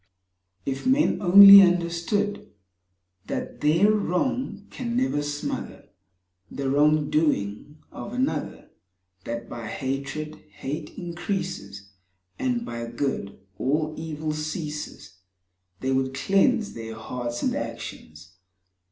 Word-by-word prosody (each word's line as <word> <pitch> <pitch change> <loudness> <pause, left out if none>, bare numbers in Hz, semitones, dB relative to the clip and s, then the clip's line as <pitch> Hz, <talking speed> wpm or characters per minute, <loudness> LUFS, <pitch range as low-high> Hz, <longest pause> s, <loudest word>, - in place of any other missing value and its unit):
If 135 - -3
men 270 -1 +3
only 200 +1 +11
understood 180 +3 0 0.8
That - - -5
their 165 +8 +4
wrong 210 +2 -1
can 240 -1 -3
never 255 - +1
smother 145 0 -5 0.6
The 135 -1 -3
wrong 150 +1 +3
doing 145 -2 0
of - - -8
another; 255 +2 -3 0.5
That 115 0 -5
by 115 -2 -7
hatred 140 +5 -4
hate 145 +3 -6
increases, 170 - -5 0.5
And 245 -2 -1
by 115 0 -5
Good 120 -4 -3 0.2
all 155 +3 0
evil 155 -1 -4
ceases, 155 - -6 0.6
They 130 - -1
would 130 0 0
cleanse 205 - +2
their 115 -1 -7
hearts 120 +2 -5
and - - +1
actions. 80 +2 -7
155 Hz, 105 wpm, -25 LUFS, 130-195 Hz, 0.8 s, only